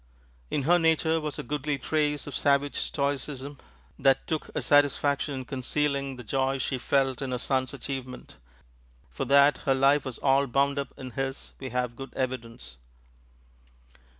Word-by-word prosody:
In 145 - -1
her 175 +5 +4
nature 160 0 +2
was 150 -1 -3
a - - -4
goodly 145 +2 -2
trace 150 +2 0
of 145 - -6
savage 140 0 +2
stoicism 140 0 -2 0.4
that 135 -1 +3
took 155 -2 -3
a - - +1
satisfaction 145 0 +3
in 130 -1 -5
concealing 140 0 -1
the 125 - -9
joy 135 +3 0
she 130 0 -2
felt 135 0 +1
in 135 - -3
her 125 - -1
son's 130 +1 0
achievement; 130 - -7 0.7
for - - -3
that 140 +1 +5
her 135 -3 +1
life 135 +2 +4
was 130 -3 -5
all 140 0 +3
bound 140 +3 +1
up 140 - -4
in 130 -1 -7
his 135 +1 -4
we 130 - -5
have 125 -1 -2
good 135 +2 -9
evidence. 115 - -4
135 Hz, 160 wpm, -27 LUFS, 130-145 Hz, 0.7 s, that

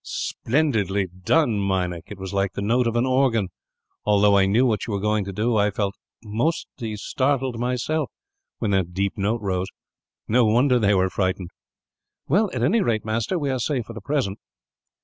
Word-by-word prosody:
"Splendidly 110 - 0
done, 105 - +1
Meinik! 90 -3 -1
It 105 - -9
was 95 0 -6
like 100 -1 0
the - - -4
note 120 +3 +2
of 115 - -1
an 120 +1 +2
organ. 130 -6 +2 0.5
Although 105 -1 +4
I 95 -1 +4
knew 115 +7 +3
what 110 -4 0
you 110 - -3
were 100 - 0
going 105 +1 +1
to 100 - -5
do, 110 +4 0
I 105 0 +3
felt 100 -1 -2 0.3
almost 120 +11 0 0.3
startled, 130 +2 -1
myself, 125 +5 -1 0.5
when 105 - -1
that 90 -3 0
deep 100 0 0
note 105 +3 -1
rose. 95 -2 -1 0.6
No 120 +3 +4
wonder 125 +4 +3
they 105 -2 +3
were 95 0 +2
frightened." 95 -2 -1 0.8
"Well, 200 +8 +3
at 125 -3 -2
any 215 - +3
rate, 110 - 0
master, 115 - -1
we 145 -4 -1
are 130 - -1
safe 125 -2 -1
for 115 - -9
the 115 - -8
present." 125 -6 -1
110 Hz, 185 wpm, -23 LUFS, 100-125 Hz, 0.8 s, Although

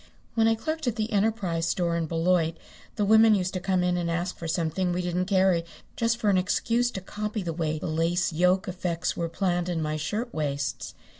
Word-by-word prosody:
When 225 -1 +3
I 225 - +4
clerked 315 +5 -3
at 235 - +1
the 220 -1 -2
Enterprise 195 -6 0
Store 170 -1 0
in 165 -1 -1
Beloit 165 0 +1 0.4
the 210 - +1
women 220 +1 +6
used 185 -2 -1
to 185 - -2
come 185 0 +1
in 180 0 +1
and 170 -1 -1
ask 175 +2 -2
for 165 - -6
something 170 +2 0
we 180 +1 -1
didn't 180 +1 -1
carry 190 -3 +3 0.3
just 230 0 +1
for 215 -3 +2
an 185 - +4
excuse 230 +5 +1
to 190 - -6
copy 210 +2 -4
the 170 -2 -3
way 160 -1 -1
the - - -6
lace 170 +2 0
yoke 180 +3 +2
effects 180 -2 -2
were 170 -1 -2
planned 175 0 -1
in 170 -2 -1
my 155 -1 -1
shirtwaists. 155 - -3
180 Hz, 210 wpm, -27 LUFS, 165-210 Hz, 0.4 s, women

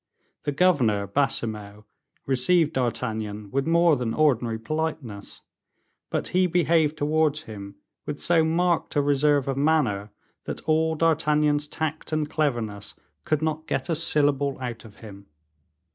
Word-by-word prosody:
The 145 - 0
governor, 135 - +2
Baisemeaux, 105 -5 -2 0.4
received 150 +5 +2
D'Artagnan 110 -5 -3
with 135 +2 -1
more 170 -1 +4
than 120 -4 -2
ordinary 125 -7 +2
politeness, 125 -4 -4 0.7
but - - -2
he 185 0 +2
behaved 160 -3 +2
towards 155 0 +1
him 100 -4 -9 0.3
with 145 -1 -4
so 170 -2 +3
marked 170 +1 0
a 145 - +4
reserve 145 0 +2
of 135 -1 -1
manner, 135 -9 +1 0.4
that - - -5
all 160 +1 +1
D'Artagnan's 150 -2 +2
tact 155 +1 -4
and 155 -1 0
cleverness 120 -10 -2 0.3
could 155 0 0
not 155 0 -2
get - - -2
a 165 - +2
syllable 145 -3 +2
out 120 -3 -6
of 105 -3 -14
him. 100 -1 -12
145 Hz, 135 wpm, -25 LUFS, 115-160 Hz, 0.7 s, more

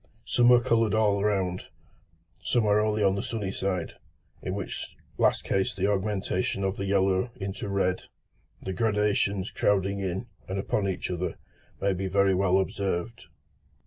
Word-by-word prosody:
Some 120 0 +4
are 125 - +8
coloured 115 -3 +2
all 105 -2 +2
round, 95 -3 0 0.7
some 120 +1 +1
only 105 0 +2
on 95 -1 +4
the 100 - -2
sunny 105 -4 -3
side, 95 -4 -2 0.5
in 95 - -3
which 100 - -6 0.2
last - - +3
case 95 -1 0
the 95 - 0
augmentation 100 -1 -1
of 95 0 0
the 100 - -3
yellow 95 +2 +2
into 100 -2 -5
red, 95 -2 0 0.6
the 95 - -3
gradations 105 -2 +1
crowding 100 0 +1
in 95 +2 -2 0.2
and 95 - -2
upon 100 +1 0
each 95 -1 -3
other, 90 +1 -2 0.4
may 100 0 +1
be 95 +1 -3
very 100 0 +3
well 95 0 +3
observed. 100 +2 -2
100 Hz, 150 wpm, -27 LUFS, 95-105 Hz, 0.7 s, are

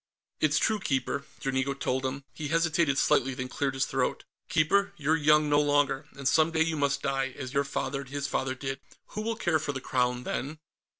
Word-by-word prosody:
"It's 155 0 +3
true, 220 -1 +2
Keeper," 140 -4 -1 0.2
Dranigo 135 0 0
told 130 -1 -1
him. 135 +1 -5
He 150 - -5
hesitated 165 -2 +2
slightly, 135 -1 +2
then 130 0 -4
cleared 135 +1 -2
his 135 - +1
throat. - - -1 0.3
"Keeper, 200 +6 +2
you're 155 +1 +2
young 150 0 +4
no 145 0 +4
longer, 145 -1 +1
and 140 -1 -2
some 155 +4 +4
day 160 -1 +2
you 165 0 -1
must 140 -1 0
die, 135 -1 -1
as 130 -2 -6
your 140 0 +2
father 140 0 -3
and 135 - -11
his 140 0 -3
father 130 -2 -1
did. 135 0 -4 0.3
Who 215 - -4
will 225 +1 -1
care 175 -7 +1
for 145 -1 -3
the 135 - -3
Crown 125 -1 0
then?" 145 +6 -3
140 Hz, 205 wpm, -28 LUFS, 135-155 Hz, 0.3 s, young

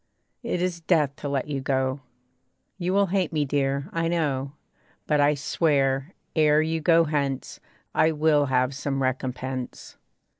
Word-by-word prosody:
It 230 -8 -2
is 180 -2 -2
death 155 -5 +2
to 145 - -5
let 140 -1 -1
you 140 -2 -3
go. 130 0 0 0.8
You 180 0 -1
will 200 +1 +3
hate 190 -4 +1
me, 150 -2 0
dear, 140 0 -1
I 165 -1 0
know; 145 -5 -1 0.5
But 150 -1 +2
I 145 +1 +4
swear, 140 0 0 0.2
ere 155 -1 +4
you 160 +1 0
go 165 +1 +5
hence, 140 -4 -2 0.3
I 160 - +3
will 150 -2 +2
have 130 +1 +1
some 135 0 -2
recompense. 130 0 -4
145 Hz, 150 wpm, -25 LUFS, 135-160 Hz, 0.8 s, go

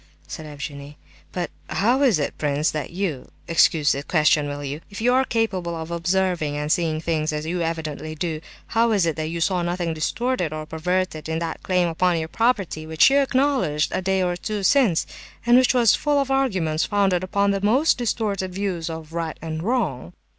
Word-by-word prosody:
said 155 - -7
Evgenie. 145 0 -8 0.3
"But—how 205 +7 -1
is 250 - +4
it, 145 - -2
prince, 150 +1 +1
that 155 -1 -4
you—(excuse 165 -3 +1
the 140 - -1
question, 150 -1 +2
will 145 0 -5
you?)—if 150 +8 -7
you 245 +3 +3
are 260 +1 +4
capable 195 -9 -1
of 160 0 -6
observing 170 -3 0
and 150 +1 -2
seeing 160 -2 +1
things 155 -1 -1
as 150 0 -3
you 175 +2 -2
evidently 155 -1 -3
do, 155 0 -3 0.3
how 230 0 +2
is 195 -5 +3
it 165 -3 0
that 155 -1 -3
you 170 +1 -4
saw 180 +2 +1
nothing 175 -1 -1
distorted 180 +3 -1
or 155 0 -5
perverted 160 0 -2
in 160 - -1
that 165 0 -4
claim 180 -2 +1
upon 170 +1 +1
your 160 0 -3
property, 200 -10 0
which 160 +10 +5
you 280 - +5
acknowledged 260 - +1
a - - 0
day 190 0 +1
or 175 -1 0
two 205 +3 -4
since; 220 - +3 0.4
and 240 +1 +5
which 255 0 +4
was 235 -4 +5
full 290 -1 +1
of 275 -1 -1
arguments 185 -13 +1
founded 195 -3 +1
upon 200 +2 +1
the 195 -1 -1
most 255 +9 +3
distorted 205 -5 -1
views 185 -4 -2
of 160 -1 -7
right 165 -1 -3
and 160 0 -5
wrong?" 165 - -1
170 Hz, 190 wpm, -23 LUFS, 155-205 Hz, 0.4 s, which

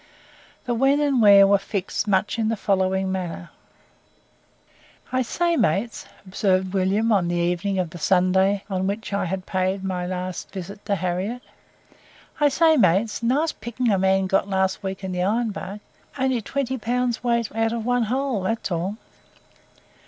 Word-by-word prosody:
The 245 - -1
when 270 +4 +3
and 285 -3 +1
the - - +3
where 200 -2 +8
were 200 0 +4
fixed 195 +1 -3
much 200 +3 +1
in 220 -1 +1
the 225 - 0
following 190 -1 0
manner: 175 - -5 1.6
"I 255 0 +1
say, 340 +7 0
mates," 205 - 0 0.2
observed 185 -1 0
William 200 +4 +1
on 190 -5 +2
the 175 - -1
evening 175 +3 0
of 180 -3 -1
the 175 - -9
Sunday 190 +3 +2
on 190 -2 -2
which 205 +1 -4
I 200 - 0
had 185 +1 -4
paid 190 +1 -1
my 180 -2 -3
last 185 0 -5
visit 200 +2 -8
to 200 - +1
Harriette, 185 +7 -3 1.0
"I 295 -1 +4
say, 320 +2 +4
mates, 200 +1 +2
nice 280 +7 +1
pickings 235 +1 -2
a 195 - +2
man 190 0 +2
got 195 +1 +1
last 190 0 0
week 190 -1 -5
in 190 - -3
the 180 0 -2
Iron 220 +4 0
Bark 200 +1 -7 0.4
only 260 -3 0
twenty 265 +3 -3
pounds 245 +1 -1
weight 235 -3 0
out 225 0 +1
of 230 -1 -3
one 245 -1 +1
hole; 260 -1 -1
that's 220 +1 -2
all." 180 +5 -2
200 Hz, 170 wpm, -23 LUFS, 185-235 Hz, 1.6 s, where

